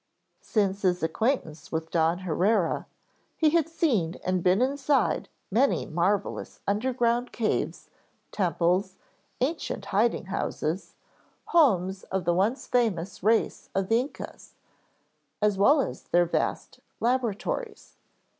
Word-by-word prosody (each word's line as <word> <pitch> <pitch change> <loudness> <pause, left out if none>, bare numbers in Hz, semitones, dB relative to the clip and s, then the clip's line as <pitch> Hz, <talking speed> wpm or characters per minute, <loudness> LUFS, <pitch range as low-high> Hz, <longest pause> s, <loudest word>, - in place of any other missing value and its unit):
Since 200 -2 0
his 180 -3 +1
acquaintance 160 - -1
with 160 0 -3
Don 165 +2 +2
Haurea 185 +1 +1 0.5
he 310 -2 +4
had 330 -1 +2
seen 245 - +1
and 185 0 +1
been 180 +3 +3
inside 270 -1 +1 0.2
many 255 +7 +2
marvelous 185 +5 -1
underground 240 +3 0
caves, 220 -2 -2 0.4
temples, 185 0 +1 0.5
ancient 275 -6 -2
hiding 220 0 +2
houses, 185 -2 -3 0.5
homes 195 - +3
of 190 -2 -3
the 175 - +3
once 205 +9 +1
famous 200 -7 0
race 220 +3 +1
of 195 -1 0
the 225 +1 +4
Yncas, 280 - -10 0.9
as 210 -2 +1
well 285 +9 +6
as 270 - -2
their 175 0 +2
vast 170 - -2 0.2
laboratories. 255 - -2
200 Hz, 115 wpm, -27 LUFS, 180-250 Hz, 0.9 s, well